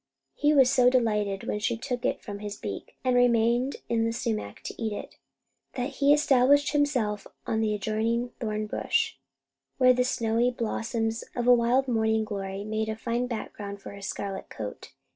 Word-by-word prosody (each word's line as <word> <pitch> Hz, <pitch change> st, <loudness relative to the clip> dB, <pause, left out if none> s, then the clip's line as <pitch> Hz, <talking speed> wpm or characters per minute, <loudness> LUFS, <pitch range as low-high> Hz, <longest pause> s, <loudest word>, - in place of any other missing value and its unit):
He 295 Hz, 0 st, +2 dB
was 275 Hz, -4 st, +6 dB
so 250 Hz, -2 st, +5 dB
delighted 210 Hz, -6 st, +1 dB
when 210 Hz, -, -2 dB
she 225 Hz, +2 st, 0 dB
took 250 Hz, 0 st, -4 dB
it -, -, -1 dB
from 205 Hz, -2 st, -6 dB
his 205 Hz, 0 st, -6 dB
beak, 100 Hz, -2 st, -6 dB
and 255 Hz, -1 st, +2 dB
remained 240 Hz, +1 st, +3 dB
in 230 Hz, -1 st, +1 dB
the 230 Hz, -, +1 dB
sumac 225 Hz, -, -3 dB
to -, -, -7 dB
eat 220 Hz, -1 st, -1 dB
it, -, -, -8 dB, 0.6 s
that 250 Hz, +2 st, -3 dB
he 280 Hz, 0 st, +4 dB
established 285 Hz, -1 st, +4 dB
himself 250 Hz, -9 st, 0 dB, 0.2 s
on 220 Hz, 0 st, 0 dB
an 215 Hz, -, +1 dB
adjoining 220 Hz, +4 st, -1 dB
thorn 215 Hz, -2 st, -2 dB
bush, 210 Hz, -, 0 dB, 0.6 s
where 255 Hz, -1 st, +6 dB
the 250 Hz, 0 st, +2 dB
snowy 230 Hz, -1 st, +1 dB
blossoms 225 Hz, -1 st, -2 dB
of 240 Hz, -, -1 dB
a 245 Hz, -, +7 dB
wild 245 Hz, +3 st, +3 dB
morning 220 Hz, -2 st, +2 dB
glory 195 Hz, -1 st, -4 dB
made 215 Hz, +1 st, -2 dB
a 220 Hz, -, -2 dB
fine 235 Hz, +2 st, -2 dB
background 205 Hz, -4 st, -6 dB
for -, -, -9 dB
his 200 Hz, -1 st, -7 dB
scarlet 195 Hz, -1 st, -5 dB
coat. 105 Hz, -2 st, -7 dB
230 Hz, 180 wpm, -27 LUFS, 210-250 Hz, 0.6 s, a